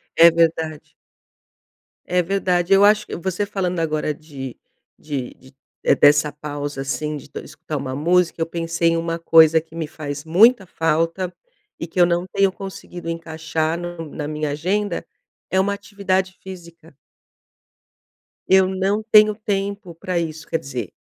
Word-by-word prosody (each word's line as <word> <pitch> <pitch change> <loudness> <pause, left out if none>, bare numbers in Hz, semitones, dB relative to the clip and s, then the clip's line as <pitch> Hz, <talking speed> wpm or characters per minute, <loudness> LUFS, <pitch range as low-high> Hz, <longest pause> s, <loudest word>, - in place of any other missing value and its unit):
É 170 0 +8
verdade. 160 -2 0 1.1
É 180 0 +1
verdade. 180 0 +1
Eu 195 +1 +6
acho 210 0 +4 0.2
você 190 +3 -1
falando 185 -3 -2
agora 155 -2 -1
de 140 -4 -9 0.4
de 140 -5 -5
de 130 +1 -19 0.3
eh, - - +4
dessa 145 +1 +5
pausa, 145 -1 -5
assim, 150 +2 -3
de 145 - -13
escutar 155 0 -7
uma 130 -1 -4
música, 170 +3 +1
eu - - +2
pensei 165 0 0
em 165 - +1
uma 165 0 -2
coisa 160 -1 +6
que 160 0 -17
me 165 -2 -3
faz 145 -2 -6
muita 205 +6 +5
falta 165 +2 -1 0.5
e - - -3
que 175 - -5
eu 175 - +7
não 175 +1 0
tenho 195 0 +2
conseguido 185 -3 -8
encaixar 160 -1 -2
no 175 -2 -6
na 145 0 -5
minha 150 0 -3
agenda, 180 +4 -1 0.4
é 190 - +1
uma 200 +1 +1
atividade 190 -2 -2
física. 170 -4 -12 1.5
Eu 190 0 +5
não 190 +3 0
tenho 215 0 +7
tempo 200 -3 -3
pra 175 +1 -2
isso. 160 -2 -5
Quer 165 - -1
dizer, 125 -7 -6
165 Hz, 150 wpm, -21 LUFS, 155-185 Hz, 1.5 s, É